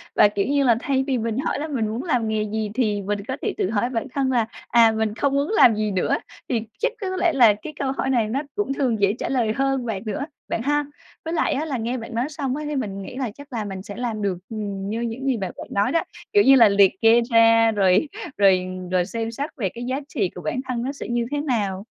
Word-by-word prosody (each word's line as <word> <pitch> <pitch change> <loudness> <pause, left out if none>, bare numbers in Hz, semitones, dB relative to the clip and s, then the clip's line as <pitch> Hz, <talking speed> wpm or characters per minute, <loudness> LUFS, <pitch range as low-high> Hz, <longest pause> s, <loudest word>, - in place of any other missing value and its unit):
Và, 210 - +7
kiểu 205 -1 -1
như 280 0 +2
là, 240 -3 +5
thay 265 +1 0
vì 265 - +1
mình 230 0 -2
hỏi 280 - -1
là: 310 - -3
"Mình 250 -8 -1
muốn 225 +4 -3
làm 250 -10 0
nghề 215 -1 0
gì?", 215 0 -3
thì 215 -5 0
mình 205 +1 -2
có 260 +1 -3
thể - - -1
tự 185 - 0
hỏi 225 +2 0
bản 235 0 -3
thân 270 -2 0
là, 235 -3 +2 0.2
à: 230 -1 +5
"Mình 220 -1 -1
không 275 +3 0
muốn 280 +2 +1
làm 250 - +6
gì 215 0 -1
nữa?" 185 -2 +1 0.3
Thì 230 -3 +1 0.2
chắc - - +1
có 375 -1 -2
lẽ 340 -3 +2
là 235 -6 +6
cái 300 +10 -9
câu 270 -1 0
hỏi 265 0 -2
này 235 -4 +2
nó 255 +6 -1
cũng 405 -10 -1
thường 245 -6 0
dễ 200 0 +4
trả - - -3
lời 235 -5 +1
hơn 270 0 0
bạn 210 -4 -3
nữa, 280 +7 -3 0.2
bạn 225 - -1
ha? 290 +2 +1 0.4
Với 325 - -3
lại 325 - +1
á 290 +3 -1
là 285 -5 -2
nghe 235 +3 -2
bạn 230 +1 -8
nói 240 +2 +1
xong 285 -4 -3
á, 300 - -4
thì 300 - -3
mình 200 -7 -3
nghĩ 195 - -8
là 255 -5 -3
chắc 285 +3 -14
là 220 -3 -2
mình 195 -2 -6
sẽ 205 - -8
làm 230 -3 -3
được, 195 -3 -1
ừm, 200 -3 -4
như 225 +2 -2
những 235 +3 -4
gì 265 -4 +1
bạn 190 -3 -3
gợi - - -8
nói 200 +1 +1
đó. 330 - +2 0.3
Kiểu 410 - +6
như 270 0 +7
là 230 -5 +7
liệt 200 -1 +5
kê 230 +1 +6
ra 230 0 +6
rồi 195 +5 +3 0.3
rồi 190 -2 +4 0.3
rồi 180 -1 +2
xem 225 +2 -4
xét 285 +7 -4
về 195 -6 -1
cái 240 +5 -8
giá 260 +2 -1
trị 205 - -1
của 180 - -7
bản 165 +11 -2
thân 245 -2 -2
nó 265 - -2
sẽ 280 - -7
như 240 0 0
thế 290 - -1
nào. 205 -8 -1
230 Hz, 275 wpm, -23 LUFS, 210-270 Hz, 0.4 s, Và